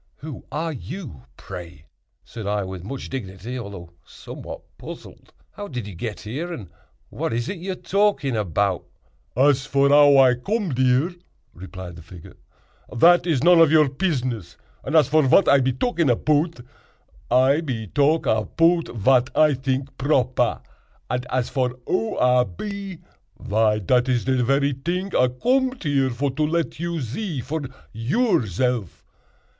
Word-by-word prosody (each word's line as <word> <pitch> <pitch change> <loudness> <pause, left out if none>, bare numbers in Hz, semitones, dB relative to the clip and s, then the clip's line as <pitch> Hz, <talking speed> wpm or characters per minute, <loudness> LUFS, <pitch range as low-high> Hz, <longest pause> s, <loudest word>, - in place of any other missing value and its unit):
"Who 150 -3 -9
are 160 +2 -2
you, 135 - -8
pray?" 85 -5 -10 0.4
said 110 -4 -8
I, 105 0 0
with 95 -2 -7
much 130 +7 -6
dignity, 115 0 -6
although 100 -7 -9
somewhat - - -10 0.2
puzzled; - - -11 0.2
"how 205 - -8
did 125 - -5
you 105 - -8
get 105 +5 -6
here? 145 +12 -5
and 105 - -8 0.4
what - - -3
is 120 +1 -2
it 190 - -5
you 190 +2 -4
are - - -7
talking 180 - 0
about?" 100 -2 0 0.5
"Az 135 0 +3
vor 140 0 +3
ow 145 -1 +7
I 130 -2 +6
com'd 170 - -2
ere," 130 +6 +3 0.4
replied 90 -1 -9
the - - -11
figure, 85 +1 -13 0.6
"dat 175 +5 +5
iz 145 -6 +1
none 175 0 +6
of 165 -3 +6
your 155 -3 +5
pizzness; 130 - -2 0.3
and 150 - -3
as 155 -5 +6
vor 155 +1 +4
vat 140 +7 +4
I 140 - +6
be 130 0 +1
talking 170 - 0
apout, 150 +4 +1 0.7
I 130 +5 +4
be 125 -8 -4
talk 145 - +1
apout 165 +10 +2
vat 125 +3 +3
I 155 -1 +5
tink 130 +1 -2
proper; 130 -2 +1 0.5
and 125 0 -2
as 125 -1 -1
vor 125 -2 -1
who 115 - -1
I 125 0 +4
be, 195 - -7 0.4
vy 105 +1 +1
dat 125 +5 +1
is 125 -3 +1
de 130 -1 +1
very 140 +3 +2
ting 180 +8 -3
I 125 - +4
com'd 255 - 0
here 140 -4 +1
for 135 +3 -2
to 155 - -4
let 165 0 -2
you 170 0 -2
zee 145 - -4
for 155 +5 -4 0.3
yourzelf." 120 - 0
130 Hz, 160 wpm, -23 LUFS, 115-160 Hz, 0.7 s, ow